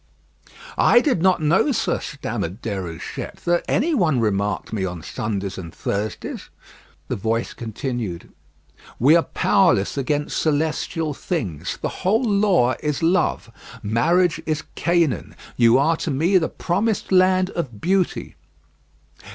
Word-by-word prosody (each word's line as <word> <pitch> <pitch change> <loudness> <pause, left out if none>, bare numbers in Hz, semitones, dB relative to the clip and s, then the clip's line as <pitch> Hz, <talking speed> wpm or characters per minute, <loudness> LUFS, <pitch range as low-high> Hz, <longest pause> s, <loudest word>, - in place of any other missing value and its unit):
"I 240 - +6
did 250 - +1
not 185 -3 +3
know, 170 - +3
sir," 240 - 0
stammered 90 +6 -5
Déruchette, 95 -7 -5
"that 175 0 +1
any 325 +6 +1
one 165 - +2
remarked 105 -1 -1
me 100 -3 -1
on 90 -3 -4
Sundays 100 -3 -4
and 85 -2 -8
Thursdays." 105 +5 -4 0.6
The - - -2
voice 115 +3 -1
continued: 115 - -5 0.7
"We 140 +7 +5
are 170 - +5
powerless 165 - +2
against 145 +2 -1
celestial 155 0 -1
things. 110 - -4
The - - -4
whole 220 +7 +2
Law 200 - +3
is 150 0 -2
love. 175 +3 +1 0.3
Marriage 160 - +2
is 155 -1 -1
Canaan; 170 -5 0 0.2
you 115 0 +5
are 160 +4 +2
to 165 - -3
me 165 +7 +3
the 160 - -1
promised 200 +4 -1
land 185 0 +4
of 125 -11 -4
beauty." 185 - 0
150 Hz, 130 wpm, -22 LUFS, 110-180 Hz, 0.7 s, I